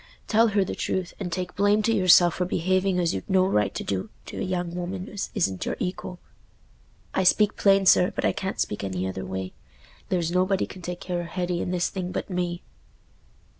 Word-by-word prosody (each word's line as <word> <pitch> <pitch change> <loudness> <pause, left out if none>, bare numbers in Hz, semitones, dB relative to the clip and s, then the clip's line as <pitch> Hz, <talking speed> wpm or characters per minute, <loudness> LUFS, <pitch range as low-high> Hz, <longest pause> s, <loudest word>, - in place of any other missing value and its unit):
Tell 225 +1 +4
her 200 -2 +2
the - - -4
truth, 185 -1 -2
and 185 -4 -4
take 180 +1 -4
blame 205 +2 +3
to 230 - +2
yourself 180 -4 +6
for 180 - -1
behaving 185 +2 +1
as 170 -2 +1
you'd 95 - -5
no 185 -1 +4
right 105 - +1
to - - -3
do 95 -2 -3 0.2
to - - -7
a - - -3
young 180 -3 -2
woman 180 +2 -4
as 200 0 -4
isn't 95 - 0
your - - -2
equal. 180 0 -4 1.0
I 190 - +1
speak 210 +3 +4
plain, 195 -1 +4
sir, 180 0 +6
but - - -1
I - - +4
can't 190 0 -4
speak 105 - -2
any 95 -1 -2
other 95 0 -5
way. 95 0 -5 0.6
There's 170 -3 0
nobody 185 +2 +2
can 185 - -11
take 180 0 -6
care 180 -1 -3
o' - - -6
Hetty 175 0 -2
in - - -3
this 180 -1 0
thing 185 -2 -4
but - - -4
me." 175 -1 -2
180 Hz, 210 wpm, -25 LUFS, 175-190 Hz, 1.0 s, yourself